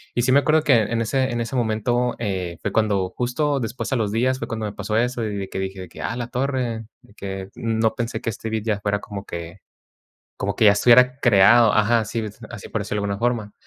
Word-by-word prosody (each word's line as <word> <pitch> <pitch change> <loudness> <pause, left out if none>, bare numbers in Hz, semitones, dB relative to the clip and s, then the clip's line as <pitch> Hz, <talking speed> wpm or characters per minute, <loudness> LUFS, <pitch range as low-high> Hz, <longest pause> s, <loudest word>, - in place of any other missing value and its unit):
Y 120 - +2
sí 130 - +2
me 140 - +6
acuerdo 155 +2 +2
que 145 - +4
en 115 +1 +1
ese 130 +3 0
en 120 - -2
ese 115 +3 -4
momento, 120 +2 0
eh, 95 -6 -3
fue 105 - -2
cuando 100 -4 +1
justo 140 +6 -1
después 115 +2 -4
a - - +2
los 105 -3 -1
días 130 +3 +1
fue - - -4
cuando 110 -1 -4
me 105 - -4
pasó 105 +1 -2
eso, 120 0 0
y 105 -1 -3
de 95 -1 -5
que - - -4
dije 95 0 -4
de 90 - -9
que: - - -11
"A 115 - -3
la 120 -1 -3
torre", 125 -3 -2 0.2
de - - -21
que 95 -2 -6
no 110 -1 0
pensé 120 0 -3
que - - -2
este 110 +1 -5
beat 110 -1 -2
ya 105 -3 0
fuera 105 0 0
como 100 -1 -7
que 85 +2 -7 0.8
como 100 0 -2
que 110 - +4
ya 100 - +8
estuviera 125 +4 +5
creado 115 0 +6
Ajá, 110 +1 +3
sí, 110 +2 -3 0.3
así 115 -4 -9
por 110 - -2
decirlo 105 +1 -3
de - - -3
alguna 100 0 -3
forma. 115 -3 -1
110 Hz, 245 wpm, -22 LUFS, 100-120 Hz, 0.8 s, ya